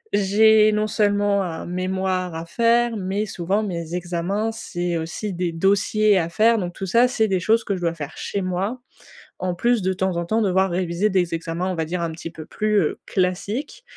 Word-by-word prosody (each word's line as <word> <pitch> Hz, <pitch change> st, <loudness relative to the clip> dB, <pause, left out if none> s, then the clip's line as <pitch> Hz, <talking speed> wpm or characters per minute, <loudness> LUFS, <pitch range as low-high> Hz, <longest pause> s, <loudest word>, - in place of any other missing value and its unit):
j'ai 215 Hz, +2 st, +5 dB
non 210 Hz, 0 st, +1 dB
seulement 205 Hz, -2 st, +2 dB
un 170 Hz, -4 st, -4 dB
mémoire 185 Hz, -1 st, -2 dB
à 165 Hz, +1 st, -5 dB
faire, 235 Hz, +4 st, +2 dB
mais 195 Hz, +2 st, -2 dB
souvent 195 Hz, +2 st, -1 dB
mes 170 Hz, -3 st, -4 dB
examens, 180 Hz, +5 st, -2 dB
c'est 175 Hz, -5 st, -3 dB
aussi 175 Hz, +5 st, -4 dB
des 175 Hz, -1 st, -2 dB
dossiers 200 Hz, +3 st, +3 dB
à 170 Hz, -1 st, -2 dB
faire. 225 Hz, +5 st, +3 dB
Donc 175 Hz, -2 st, -4 dB
tout 195 Hz, -, -5 dB
ça 235 Hz, +7 st, +4 dB
c'est 220 Hz, -3 st, +1 dB
des 190 Hz, -2 st, +1 dB
choses 225 Hz, +5 st, +2 dB
que 200 Hz, -, -2 dB
je 180 Hz, -, -6 dB
dois 170 Hz, -1 st, 0 dB
faire 150 Hz, -1 st, -7 dB
chez 200 Hz, -, -3 dB
moi, 190 Hz, +7 st, -2 dB, 0.6 s
en 180 Hz, -1 st, -2 dB
plus 235 Hz, +3 st, +2 dB
de 190 Hz, -, 0 dB
temps 190 Hz, -1 st, -1 dB
en 170 Hz, -, -1 dB
temps 220 Hz, +6 st, +1 dB
devoir 190 Hz, 0 st, +2 dB
réviser 180 Hz, +3 st, 0 dB
des 180 Hz, -3 st, +1 dB
examens 165 Hz, +2 st, -3 dB
on -, -, -3 dB
va 160 Hz, -1 st, -1 dB
dire 175 Hz, +2 st, -3 dB
un 165 Hz, -1 st, -2 dB
petit 165 Hz, +1 st, -7 dB
peu 160 Hz, -1 st, -10 dB
plus, 210 Hz, +3 st, +1 dB
heu, 155 Hz, -, -1 dB
classiques. 205 Hz, -, -2 dB
190 Hz, 205 wpm, -22 LUFS, 175-215 Hz, 0.6 s, j'ai